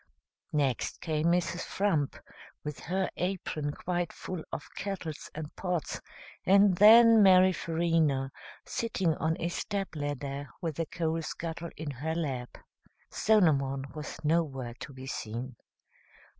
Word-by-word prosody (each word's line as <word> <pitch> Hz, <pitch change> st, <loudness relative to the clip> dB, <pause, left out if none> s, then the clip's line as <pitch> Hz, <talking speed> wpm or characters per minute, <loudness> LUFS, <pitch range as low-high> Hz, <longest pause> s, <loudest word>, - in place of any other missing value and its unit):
Next 140 Hz, -5 st, 0 dB
came 155 Hz, -1 st, 0 dB
Mrs. 175 Hz, 0 st, +1 dB
Frump, 175 Hz, -8 st, 0 dB, 0.5 s
with 150 Hz, -1 st, -5 dB
her 190 Hz, +3 st, -1 dB
apron 170 Hz, -5 st, -2 dB
quite 175 Hz, +2 st, -2 dB
full 180 Hz, -4 st, -6 dB
of 145 Hz, -, -5 dB
kettles 185 Hz, -6 st, -5 dB
and 155 Hz, 0 st, -6 dB
pots, 180 Hz, -5 st, -2 dB, 0.4 s
and 195 Hz, 0 st, +5 dB
then 225 Hz, +3 st, +8 dB
Mary 185 Hz, -1 st, +7 dB
Farina, 160 Hz, -6 st, +1 dB, 0.3 s
sitting 190 Hz, -7 st, 0 dB
on 160 Hz, +1 st, 0 dB
a 170 Hz, -, -1 dB
step 195 Hz, +2 st, -3 dB
ladder 145 Hz, -1 st, -4 dB
with 160 Hz, -4 st, -3 dB
the 165 Hz, -1 st, -1 dB
coal 165 Hz, 0 st, -1 dB
scuttle 165 Hz, +1 st, -5 dB
in 155 Hz, -2 st, -4 dB
her 150 Hz, +5 st, -3 dB
lap. 135 Hz, -7 st, -3 dB, 0.5 s
Solomon 140 Hz, -11 st, +3 dB
was 150 Hz, -1 st, -6 dB
nowhere 145 Hz, -6 st, 0 dB
to -, -, -7 dB
be 130 Hz, -1 st, -10 dB
seen. 120 Hz, 0 st, -5 dB
160 Hz, 130 wpm, -30 LUFS, 145-180 Hz, 0.5 s, then